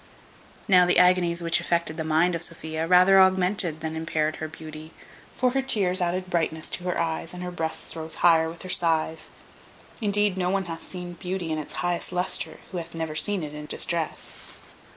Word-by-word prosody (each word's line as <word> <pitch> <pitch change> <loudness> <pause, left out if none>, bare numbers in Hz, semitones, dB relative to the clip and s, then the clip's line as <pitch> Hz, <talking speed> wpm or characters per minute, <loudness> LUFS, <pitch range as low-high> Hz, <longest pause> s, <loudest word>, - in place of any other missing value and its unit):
Now 180 -3 +6
the 180 - +3
agonies 175 -1 +4
which 165 0 +2
affected 170 -2 0
the 160 - -3
mind 160 +3 +2
of 170 - -3
Sophia, 160 -1 -4
rather 185 +2 +6
augmented 185 -3 +3
than 160 0 -4
impaired 155 -1 -1
her 155 - -4
beauty; 155 0 -10 0.4
for 250 0 +2
her 270 +1 +1
tears 195 -8 +1
added 180 +1 -1
brightness 165 -3 -1
to 180 - -4
her 180 - -1
eyes, 165 +1 -2
and 180 - -6
her 180 - -4
breasts 160 -2 -4
rose 160 0 -5
higher 160 -1 +5
with 165 +2 -10
her - - -7
sighs. 165 -3 +1 0.7
Indeed, 205 -2 +1
no 180 -1 0
one 195 0 0
hath 165 -1 -6
seen 180 -1 -6
beauty 180 -1 -4
in 155 - -1
its 150 - -6
highest 175 0 -2
lustre 180 0 -2
who 180 - -3
hath 165 0 -9
never 160 -1 -3
seen 185 +4 +1
it 150 -1 -6
in 150 0 -8
distress. 165 +1 -1
170 Hz, 195 wpm, -25 LUFS, 160-180 Hz, 0.7 s, Now